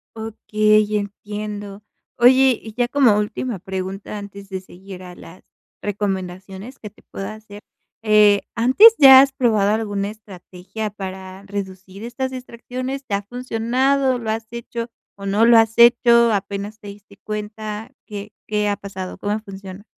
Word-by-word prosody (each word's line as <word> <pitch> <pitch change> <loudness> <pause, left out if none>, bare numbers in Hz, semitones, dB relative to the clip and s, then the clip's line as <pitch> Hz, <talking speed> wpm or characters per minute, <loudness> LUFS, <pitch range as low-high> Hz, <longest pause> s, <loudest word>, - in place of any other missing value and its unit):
Okey, 215 -1 +1
entiendo. 205 0 -6 0.3
Oye, 255 +1 +5
y 220 - -10
ya 245 0 0
como 255 -6 +4
última 210 +1 -3
pregunta, 190 +2 -6
antes 200 -1 -10
de 190 -1 -4
seguir 185 0 -12
a 180 -1 -11
las 170 +2 -14 0.4
recomendaciones 195 +3 -5
que 210 - -8
te - - -24
puedo 195 - -7
hacer, 215 -1 -11 0.4
eh, 210 -2 +5
¿antes 260 - +7
ya 265 -2 +10
has 275 0 +2
probado 220 -7 +1
alguna 205 -2 -2
estrategia 205 0 -8
para 190 -1 -8
reducir 195 0 -7
estas 260 +3 -4
distracciones?, 255 +2 -6
¿te - - -6
ha 200 - -2
funcionado? 250 +4 0
¿Lo 225 -2 -5
has 225 0 -4
hecho 235 0 -6 0.3
o 200 - -10
no 205 +3 +2
la 230 -1 +7
has 225 0 -3
hecho, 235 -1 +6
apenas 200 +1 -4
te 205 - -12
diste 200 0 -14
cuenta, 215 +1 -6 0.2
qué 210 -1 -8
qué 210 -1 0
ha 205 - 0
pasado, 190 -2 -8
cómo 205 +2 -2
funcionan? 195 -1 -11
210 Hz, 150 wpm, -20 LUFS, 200-235 Hz, 0.4 s, ya